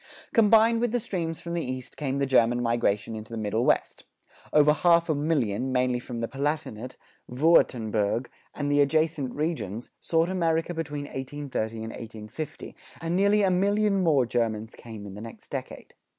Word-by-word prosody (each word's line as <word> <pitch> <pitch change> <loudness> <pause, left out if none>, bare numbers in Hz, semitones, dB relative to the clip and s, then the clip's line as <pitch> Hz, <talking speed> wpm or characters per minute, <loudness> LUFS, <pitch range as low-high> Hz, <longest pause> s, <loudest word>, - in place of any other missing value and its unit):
Combined 225 +1 +5
with 240 -2 +1
the 245 - +1
streams 165 -7 -3
from 170 - -5
the 170 - 0
East 130 0 -6
came 140 -2 -2
the 140 - +1
German 120 -2 +3
migration 115 -2 0
into 110 +1 -8
the 115 - -4
Middle 110 +2 0
West. - - +1 0.5
Over 150 0 +5
half 170 +1 +3
a - - +4
million, 135 -6 0
mainly 125 -1 +1
from 120 -1 -6
the 115 - -1
Palatinate, 135 -4 -3 0.3
Würtemberg, 120 -6 +2 0.3
and 145 -1 -1
the 145 0 +4
adjacent 155 -2 +1
regions, 145 - -3
sought 165 0 +1
America 165 -2 0
between 150 -3 -4
1830 135 -5 -4
and 110 - -5
1850, 115 +7 -8 0.2
and 165 +1 -2
nearly 200 +2 +4
a 190 - +3
million 200 +2 +2
more 150 -7 +3
Germans 115 -2 -1
came 110 -3 -10
in 100 - -8
the 105 - -8
next 115 0 -10
decade. - - -7
140 Hz, 165 wpm, -27 LUFS, 115-165 Hz, 0.5 s, Combined